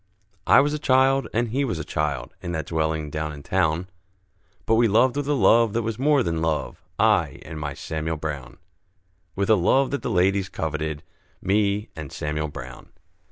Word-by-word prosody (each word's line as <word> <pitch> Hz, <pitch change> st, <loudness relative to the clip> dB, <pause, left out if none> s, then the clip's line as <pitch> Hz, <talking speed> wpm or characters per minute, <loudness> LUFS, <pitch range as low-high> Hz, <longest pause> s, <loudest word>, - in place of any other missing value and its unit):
I -, -, +7 dB
was 145 Hz, +1 st, 0 dB
a 150 Hz, -, -2 dB
child, 135 Hz, -1 st, +3 dB
and 115 Hz, +1 st, 0 dB
he 135 Hz, +5 st, 0 dB
was 115 Hz, -11 st, -2 dB
a 80 Hz, -, -4 dB
child, 75 Hz, -4 st, -3 dB
In 85 Hz, -, -4 dB
that 80 Hz, -1 st, -3 dB
dwelling 80 Hz, -2 st, -1 dB
down 75 Hz, 0 st, -3 dB
in 70 Hz, -1 st, -10 dB
town, 80 Hz, +5 st, 0 dB, 0.8 s
But 115 Hz, -, +2 dB
we 115 Hz, +1 st, +4 dB
loved 120 Hz, +5 st, +3 dB
with 145 Hz, -1 st, -2 dB
a 145 Hz, -, +2 dB
love 115 Hz, -1 st, +4 dB
that 115 Hz, -, 0 dB
was 110 Hz, 0 st, -3 dB
more 145 Hz, -1 st, +3 dB
than 80 Hz, -2 st, -2 dB
love, 80 Hz, -2 st, -2 dB, 0.2 s
I -, -, +2 dB
and 80 Hz, 0 st, -7 dB
my 70 Hz, -2 st, -4 dB
Samuel 80 Hz, +2 st, -3 dB
Brown, 75 Hz, -5 st, -6 dB, 0.8 s
With 100 Hz, +2 st, +1 dB
a -, -, +7 dB
love 130 Hz, +9 st, +2 dB
that 140 Hz, -, -2 dB
the -, -, -3 dB
ladies 95 Hz, +1 st, +2 dB
coveted, 80 Hz, -2 st, -3 dB, 0.4 s
Me 100 Hz, +1 st, 0 dB
and 75 Hz, -3 st, -7 dB
Samuel 75 Hz, +1 st, -3 dB
Brown. 65 Hz, -4 st, -10 dB
90 Hz, 190 wpm, -24 LUFS, 75-115 Hz, 0.8 s, I